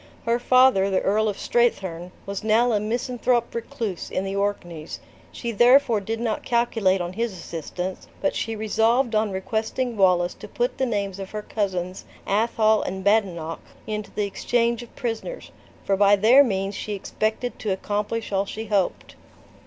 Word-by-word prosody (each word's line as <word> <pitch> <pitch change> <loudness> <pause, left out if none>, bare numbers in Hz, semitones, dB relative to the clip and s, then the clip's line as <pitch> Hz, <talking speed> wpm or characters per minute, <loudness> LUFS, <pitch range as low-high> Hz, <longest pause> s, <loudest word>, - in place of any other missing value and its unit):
Her 235 +1 +2
father, 255 -6 +5
the 190 - +1
Earl 215 +2 +2
of 205 - -4
Strathearn, 185 -7 0
was 200 0 -5
now 225 +3 +3
a 210 - +2
misanthrope 240 +2 0
recluse 225 -5 -4
in 185 - -2
the 195 0 -3
Orkneys; 175 -6 -3 0.3
she 235 - -4
therefore 240 -1 +5
did 225 +3 -3
not 230 -2 -1
calculate 225 -6 +1
on 175 +1 -4
his 230 +1 -2
assistance, 180 +1 -6
but - - 0
she 225 0 -2
resolved 225 +3 +2
on 215 0 +2
requesting 220 +5 -2
Wallace 180 -3 +3
to - - -11
put - - -2
the 265 - +1
names 200 -4 -2
of 195 -1 -6
her 210 -1 -5
cousins, 185 -4 -3 0.2
Athol 220 +1 +3
and 190 +1 -4
Badenoch, 185 -6 +1 0.2
into 210 -1 -4
the 210 - -2
exchange 235 +3 0
of 240 - -13
prisoners, 245 - -5 0.3
for 195 - +2
by 200 +1 +5
their 230 +8 +6
means 195 -5 -1
she 210 +1 -4
expected 215 +4 -2
to 215 - -3
accomplish 210 +4 -2
all 195 0 0
she 220 +3 -5
hoped. 200 -4 -1
215 Hz, 165 wpm, -24 LUFS, 195-235 Hz, 0.3 s, their